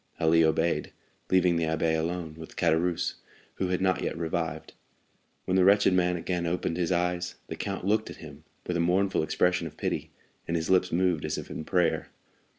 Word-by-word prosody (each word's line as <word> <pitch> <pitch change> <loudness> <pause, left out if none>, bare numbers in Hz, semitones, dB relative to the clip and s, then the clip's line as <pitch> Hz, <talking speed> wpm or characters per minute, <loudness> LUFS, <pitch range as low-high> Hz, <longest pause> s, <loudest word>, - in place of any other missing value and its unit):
Ali 80 +1 +4
obeyed, 80 -1 +1 0.4
leaving 90 -2 +3
the 85 - +1
abbé 80 0 +1
alone 80 0 -2
with 80 0 -11
Caderousse, 85 +1 +1 0.4
who 95 - 0
had 90 0 -1
not 95 -1 +2
yet - - -2
revived. 80 -1 -3 0.7
When 95 - 0
the 95 - +5
wretched 100 0 +5
man 90 -1 +2
again 85 0 -2
opened 85 -1 -1
his 90 0 -1
eyes, 90 0 0
the - - -4
count 95 -2 -4
looked 110 +2 +1
at - - -8
him 75 -2 -12 0.2
with 90 - -2
a - - -1
mournful 95 +3 +2
expression 90 +2 +1
of 80 - -12
pity, - - -2 0.4
and 85 - 0
his 80 +2 -2
lips 95 0 +3
moved 90 -2 +1
as - - -2
if - - -7
in 80 - -5
prayer. 90 -3 +1
85 Hz, 190 wpm, -28 LUFS, 80-90 Hz, 0.7 s, the